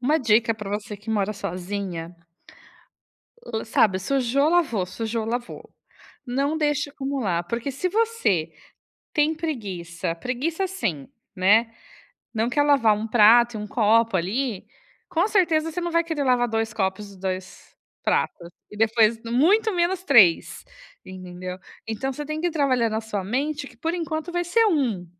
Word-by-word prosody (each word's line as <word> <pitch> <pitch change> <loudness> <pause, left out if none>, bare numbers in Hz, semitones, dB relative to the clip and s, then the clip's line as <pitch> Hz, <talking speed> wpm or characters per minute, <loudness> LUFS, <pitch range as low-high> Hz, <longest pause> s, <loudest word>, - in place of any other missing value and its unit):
Uma 295 +6 +2
dica 230 -3 +3
pra 210 -2 -7
você 210 +1 -4
que 210 +3 -8
mora 210 -1 0
sozinha 180 -3 -5 1.3
o 220 - -4
sabe? 200 -3 +2
Sujou, 270 +6 +1
lavou. 300 - +1
Sujou, 220 +4 -3
lavou. 240 +2 -5 0.6
Não 280 +5 -1
deixe 295 -2 0
acumular. 270 -12 -2
Porque, 235 +9 -3
se 325 +8 -2
você 385 - 0 0.6
tem 305 +1 +2
preguiça 190 - -4
preguiça, 260 - -2
assim, 230 - -3 0.3
né, 220 +5 +3 0.6
não 225 +1 0
quer 290 - +2
lavar 275 -7 +4
1 215 +2 -4
prato 235 +2 +5
e - - -4
1 210 - -5
copo 230 -3 +3
ali, 205 +4 -2 0.4
com 335 +4 +1
certeza 325 -6 +2
você 355 - -3
não 345 0 -2
vai 335 0 +3
querer 320 -4 -2
lavar 250 -2 +2
2 225 -1 -1
copos 200 0 -2
e 195 - -15
2 185 -1 -6 0.3
pratos. 170 - -1 0.2
E 210 - -11
depois, 225 +1 +3
muito 340 - +3
menos 355 +1 0
3, 190 - +4 0.4
entendeu? 185 0 -8 0.3
Então 245 +5 -3
você 295 +3 -6
tem 305 +1 -4
que 350 - +1
ir - - -4
trabalhando 255 -8 +1
a - - -1
sua 220 -3 -4
mente 285 +7 -2
que, 250 - -19
por 325 +8 -2
enquanto, 330 -1 -4
vai 350 0 0
ser 450 +6 +3
1. 250 - 0
235 Hz, 155 wpm, -24 LUFS, 205-300 Hz, 1.3 s, prato